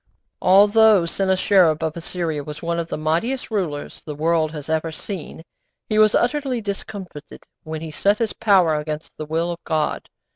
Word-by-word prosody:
' - - -52
Although 205 0 +6
Sennacherib 185 -3 +2
of 160 -1 -2
Assyria 165 -3 -3
was 150 +2 -9
one 170 0 -1
of 165 - -3
the - - -4
mightiest 170 +13 -1
rulers 170 -9 -3
the 150 - -6
world 160 0 +1
has 150 -3 -8
ever 160 +1 -1
seen, 160 -1 -7 0.5
he 215 -1 +2
was 215 0 +5
utterly 265 -1 0
discomfited 195 -6 -7 0.2
when 155 -1 -6
he 160 -1 -6
set 200 +7 +2
his 225 -2 -1
power 190 -8 +3
against 150 +1 -6
the 155 - -6
will 165 +2 -1
of 170 - -6
God. 155 -2 -2
170 Hz, 175 wpm, -22 LUFS, 155-205 Hz, 0.5 s, Although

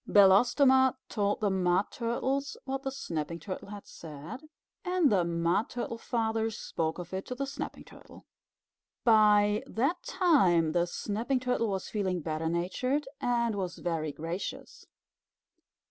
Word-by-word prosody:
Belostoma 255 +7 +5
told 205 -1 0
the 205 -2 +2
Mud 185 +1 +1
Turtles 265 +4 -2
what 270 0 -3
the 270 - -3
Snapping 170 - -4
Turtle 185 +4 -6
had 205 0 -9
said, 160 - -9 0.4
and 360 - +2
the 190 -4 +3
Mud 170 +4 0
Turtle 235 -1 -4
Father 225 -1 -1
spoke 165 -6 -3
of 180 0 -8
it 190 +1 -2
to 250 - -4
the 275 +2 -2
Snapping 280 +2 -6
Turtle. - - -15 0.8
By 210 -2 +5
that 275 +10 0
time 195 - +3
the 175 +1 +1
Snapping 225 +8 -2
Turtle 250 -2 0
was 190 -1 -3
feeling 190 -4 -1
better 155 +1 -2
natured 255 - -1
and 235 -2 +1
was 185 -3 -3
very 160 -3 -2
gracious. 175 - -6
210 Hz, 140 wpm, -30 LUFS, 175-250 Hz, 0.8 s, Belostoma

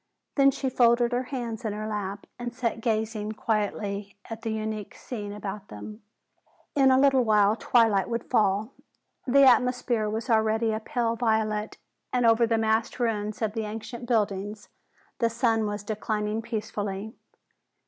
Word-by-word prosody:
Then 275 -1 +5
she 275 0 -2
folded 240 -1 +3
her 245 +1 0
hands 240 -3 -5
in 215 -2 -2
her 215 +1 -4
lap 205 -2 -4
and 240 0 -5
sat 230 -3 -2
gazing 220 -2 -1
quietly 205 -2 -2 0.2
at 225 0 -6
the 225 - -3
unique 215 -1 -4
scene 210 -5 -6
about 205 0 -6
them. 215 +1 -9 0.7
In 270 -3 +5
a 260 - +5
little 270 -1 +4
while 210 -2 +4
twilight 225 -5 +3
would 230 -1 -2
fall. 210 0 +1 0.6
The 275 +2 +6
atmosphere 245 -3 +3
was 220 +3 -3
already 220 -1 +2
a 215 - -1
pale 230 +1 -1
violet 220 -2 0 0.3
and 250 -1 +1
over 230 0 +5
the 225 0 +2
massed 220 +2 0
ruins 215 -2 -1
of 210 -1 0
the 220 -1 -2
ancient 225 +3 -7
buildings 210 -2 -1 0.5
the 230 -2 +3
sun 230 -2 +1
was 205 0 -4
declining 215 0 -2
peacefully. 215 -2 -4
220 Hz, 155 wpm, -27 LUFS, 210-235 Hz, 0.7 s, The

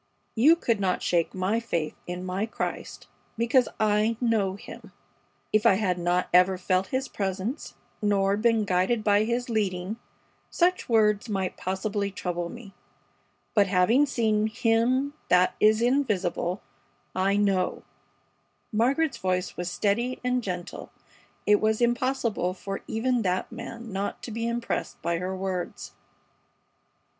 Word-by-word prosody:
You 285 +9 +6
could 230 -10 0
not 185 -2 0
shake 170 0 +1
my 190 +5 0
faith 170 -9 -3
in 180 +1 -5
my 190 +4 -2
Christ, - - -5 0.3
because 235 +2 +3
I 215 +1 +2
know 220 -6 +1
Him. 200 - -11 0.6
If 215 0 +4
I 190 - +6
had 185 -3 0
not 175 +1 +1
ever 180 +1 +5
felt 185 +1 0
His 260 +5 -2
presence, 195 +7 -4 0.3
nor 200 -1 +2
been 225 0 +2
guided 190 +4 +1
by 205 0 +3
His 240 +2 -1
leading, 205 -3 -1 0.5
such 360 -3 +1
words 215 -1 +3
might 190 -3 -2
possibly 200 +2 -2
trouble 175 -3 -3
me, 220 -3 -11 0.8
but 205 -3 +4
having 200 +10 +3
seen 220 -5 +1
'Him 235 +6 +1 0.2
that 180 0 +4
is 215 +2 +4
invisible,' 205 -8 0 0.5
I 195 +2 +1
know." 195 -3 +1 0.9
Margaret's 270 +8 +1
voice 185 0 -1
was 180 0 -3
steady 230 +7 0
and 250 0 +1
gentle. 180 -5 -6 0.5
It 210 0 +4
was 220 0 +2
impossible 240 -6 0
for 195 +1 -5
even 240 +2 0
that 185 -2 -1
man 230 -2 -8
not 195 +1 -3
to 235 - -6
be 230 +1 -2
impressed 235 0 -3
by 170 0 0
her 185 +1 -3
words. 185 -2 -4
210 Hz, 135 wpm, -26 LUFS, 185-230 Hz, 0.9 s, You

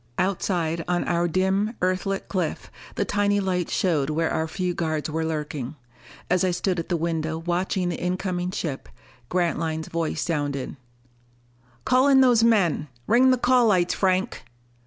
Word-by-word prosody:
Outside 175 -3 0
on 175 0 +1
our 175 0 +1
dim, 190 +6 0
Earthlit 185 +2 -1
cliff, 180 -5 -3 0.2
the 200 - 0
tiny 205 +1 +1
lights 185 -3 -1
showed 155 -7 +1
where 160 +1 0
our 160 - -1
few 180 +2 -2
guards 155 -2 -2
were 160 +1 -1
lurking. 150 -4 -4 0.5
As 180 +1 +2
I 185 - +2
stood 180 0 -1
at 165 - -5
the 175 - +1
window 160 -1 -2
watching 175 +2 -1
the 170 - -4
incoming 180 0 -2
ship, 155 -7 -4 0.4
Grantline's 165 -2 -1
voice 165 -1 -2
sounded: 145 -5 -2 1.1
"Call 255 +2 +4
in 270 -1 +6
those 245 -3 +5
men! 195 -10 +2 0.2
Ring 250 +3 +5
the 255 - +4
call 245 -1 +4
lights, 180 -4 +2
Franck!" 190 +3 0
180 Hz, 155 wpm, -24 LUFS, 160-195 Hz, 1.1 s, in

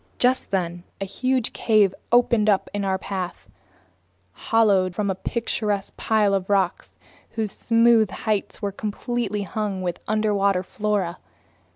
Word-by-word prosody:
Just 255 +1 +2
then 175 -2 -2 0.2
a 195 - -2
huge 255 +4 0
cave 210 -4 +3 0.2
opened 235 -3 +4
up 195 -2 +1
in 205 0 -2
our 190 -1 0
path, 185 - -5 0.8
hollowed 195 - +2
from 200 -1 0
a - - 0
picturesque 205 0 -2
pile 215 -2 +2
of 195 -1 -1
rocks 195 -3 0 0.4
whose 220 -3 -2
smooth 230 -1 +3
heights 215 +2 -3
were 200 - 0
completely 210 +1 -3
hung 195 0 -3
with 175 -1 -3
underwater 200 -3 +1
flora. 200 -3 -2
205 Hz, 135 wpm, -23 LUFS, 190-220 Hz, 0.8 s, opened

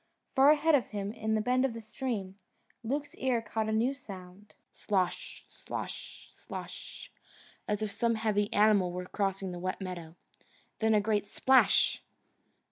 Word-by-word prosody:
Far 275 0 +6
ahead 310 +1 +4
of 270 -5 +4
him 205 -1 -4
in 220 -1 -1
a - - +1
bend 250 +3 +2
of 265 -3 +1
the - - -5
stream, 215 -4 -4 0.4
Luke's 285 +5 -2
ear 255 -3 +1
caught 220 0 -2
a - - 0
new 230 +5 +2
sound: 195 -5 -11 0.2
SLOSH, 185 -3 -2
SLOSH, - - -7
SLOSH, - - -8 0.6
as 210 +1 -1
if 210 - -2
some 230 +2 +1
heavy 210 -2 0
animal 205 -4 +4
were 180 +1 -4
crossing 195 -1 -2
the 175 - -6
wet 185 +1 -3
meadow. 175 -4 -6 0.6
Then 220 -1 +3
a 210 - +4
great 205 -1 0
splash! 260 +5 +4
215 Hz, 155 wpm, -31 LUFS, 195-235 Hz, 0.6 s, Far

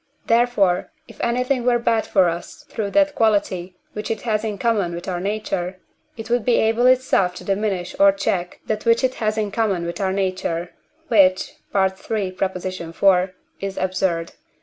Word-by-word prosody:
Therefore, 230 -6 +2 0.2
if - - -11
anything 250 +2 0
were 245 0 +3
bad 230 -1 +1
for 190 -3 +4
us 170 +1 -5
through 215 -3 -3
that 295 +5 +3
quality 190 -5 0 0.2
which 210 - -5
it 225 - -2
has 215 -2 0
in 215 -2 -3
common 200 -5 0
with 170 - -7
our 180 -2 -2
nature, 190 -2 -3 0.4
it 225 -1 -7
would 240 -1 +1
be 240 0 +3
able 225 +3 +3
itself 255 -8 +3
to - - -9
diminish 195 -3 -2
or 200 0 +7
check 190 -2 -2
that 215 -1 -2
which 230 +2 +3
it 260 0 +2
has 215 0 0
in 210 -2 -1
common 200 -5 0
with 170 +4 -4
our 190 -1 +1
nature, 185 -3 -2 0.4
which 190 -5 +4 0.2
(III. 190 +1 0
iv.) 185 0 0 0.3
is 195 -1 -5
absurd. 185 -3 -1
195 Hz, 170 wpm, -21 LUFS, 185-225 Hz, 0.4 s, or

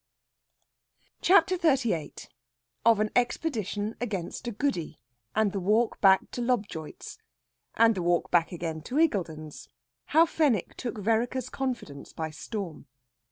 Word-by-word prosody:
CHAPTER 370 0 +5
XXXVIII 255 - 0 0.6
OF 225 -2 +5
AN 215 - 0
EXPEDITION 225 - -1
AGAINST 210 0 -4
A - - -1
GOODY, 200 - -2 0.4
AND 215 -2 +2
THE 195 - -2
WALK 215 +5 +1
BACK 190 -1 +5
TO 245 - -4
LOBJOIT'S. 210 -10 -3 0.6
AND 230 0 +5
THE 190 - -3
WALK 175 0 +1
BACK 170 -2 +3
AGAIN 165 -2 -4
TO 250 - -4
IGGULDEN'S. 165 - -1 0.4
HOW 320 +3 +5
FENWICK 290 - +1
TOOK 240 -3 -5
VEREKER'S 230 +5 0
CONFIDENCE 240 - -5
BY 160 -1 -4
STORM. 170 -2 -6
215 Hz, 125 wpm, -28 LUFS, 175-245 Hz, 0.6 s, CHAPTER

